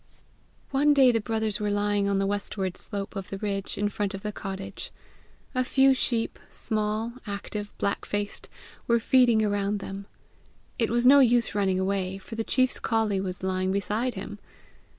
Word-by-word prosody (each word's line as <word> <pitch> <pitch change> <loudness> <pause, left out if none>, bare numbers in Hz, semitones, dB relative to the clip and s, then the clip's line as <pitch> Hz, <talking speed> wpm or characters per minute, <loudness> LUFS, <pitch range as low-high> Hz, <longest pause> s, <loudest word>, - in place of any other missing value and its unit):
One 290 +2 +4
day 265 -3 +7
the 225 -1 0
brothers 220 -1 -1
were 210 -1 -1
lying 205 0 +1
on 200 - +1
the 195 - +1
westward 195 -2 -2
slope 200 +1 -6
of 195 -2 -5
the 195 - -4
ridge, 195 -1 -3
in 205 +1 +1
front 205 -1 -2
of 195 - -8
the 210 - -2
cottage. 195 -1 -6 0.6
A 255 -1 +1
few 270 +1 +4
sheep, 235 -3 -1
small, 215 +2 -2
active, 205 +1 -5
black 200 - -1
faced, 205 0 -3 0.4
were 235 0 +4
feeding 235 -2 +4
around 205 0 0
them: 195 0 -7 0.7
it 230 - +2
was 240 +1 +1
no 280 +2 +8
use 240 -3 +4
running 195 -2 +1
away, 190 0 -1
for 195 +4 -11
the 225 0 -2
chief's 255 +2 +2
colley 220 -4 +1
was 185 -1 -5
lying 185 0 0
beside 210 +6 -1
him! 205 +2 -7
205 Hz, 170 wpm, -27 LUFS, 195-230 Hz, 0.7 s, no